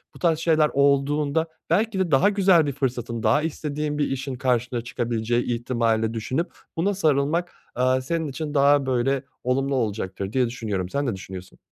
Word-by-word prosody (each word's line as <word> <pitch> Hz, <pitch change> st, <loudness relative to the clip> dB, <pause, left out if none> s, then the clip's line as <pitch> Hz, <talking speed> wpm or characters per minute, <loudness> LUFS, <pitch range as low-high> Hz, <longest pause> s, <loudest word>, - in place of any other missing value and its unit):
bu -, -, -12 dB
tarz 165 Hz, -3 st, +2 dB
şeyler 155 Hz, -2 st, +3 dB
olduğunda 140 Hz, +3 st, +2 dB, 0.2 s
belki 215 Hz, -2 st, +1 dB
de 180 Hz, -4 st, 0 dB
daha 135 Hz, +8 st, +5 dB
güzel 190 Hz, -5 st, +4 dB
bir -, -, 0 dB
fırsatın 120 Hz, -4 st, -3 dB
daha 150 Hz, -, +3 dB
istediğin 150 Hz, -1 st, -3 dB
bir 145 Hz, -, +1 dB
işin 135 Hz, 0 st, -3 dB
karşına 125 Hz, -1 st, 0 dB
çıkabileceği 120 Hz, 0 st, -1 dB
ihtimalini 115 Hz, -2 st, 0 dB
de -, -, -7 dB
düşünüp 130 Hz, -, -2 dB, 0.3 s
buna 195 Hz, +5 st, +1 dB
sarılmak, 155 Hz, 0 st, +1 dB, 0.2 s
eee, 130 Hz, +1 st, +2 dB
senin 160 Hz, +4 st, -2 dB
için 145 Hz, +2 st, -5 dB
daha 140 Hz, -1 st, +4 dB
böyle 130 Hz, +1 st, 0 dB, 0.2 s
olumlu 135 Hz, +2 st, 0 dB
olacaktır 100 Hz, -4 st, -3 dB
diye 130 Hz, -1 st, +3 dB
düşünüyorum. 105 Hz, -6 st, -3 dB
Sen 140 Hz, +6 st, -1 dB
ne 120 Hz, -, -1 dB
düşünüyorsun? 95 Hz, -1 st, -10 dB
135 Hz, 170 wpm, -24 LUFS, 120-150 Hz, 0.3 s, daha